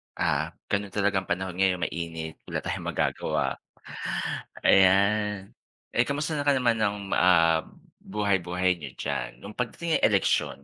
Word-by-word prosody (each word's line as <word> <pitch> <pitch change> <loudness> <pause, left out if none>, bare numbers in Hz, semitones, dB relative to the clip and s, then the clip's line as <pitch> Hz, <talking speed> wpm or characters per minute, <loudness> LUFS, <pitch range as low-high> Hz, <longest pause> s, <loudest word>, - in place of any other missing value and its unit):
Ah, - - 0 0.2
ganun 100 -1 -1
talaga 100 -1 +2
ang 95 - -10
panahon 90 0 -2
ngayon 95 -2 +2
mainit, 80 -2 -4
wala - - -3
tayong - - -4
magagawa. - - -1 1.1
Ayan. 100 +1 +4 0.4
Eh, 120 - +2
kamusta 150 +2 -1
ka 145 - +5
naman 120 -3 +2
ng, 105 -1 +1 0.2
ah, 85 -3 +4 0.4
buhay-buhay 95 -3 0
n'yo 70 -5 -7
diyan, - - -4
nung 100 - -7
pagdating 160 +7 -1
ng - - +4
eleksyon, 70 - +1
95 Hz, 135 wpm, -27 LUFS, 90-105 Hz, 1.1 s, ka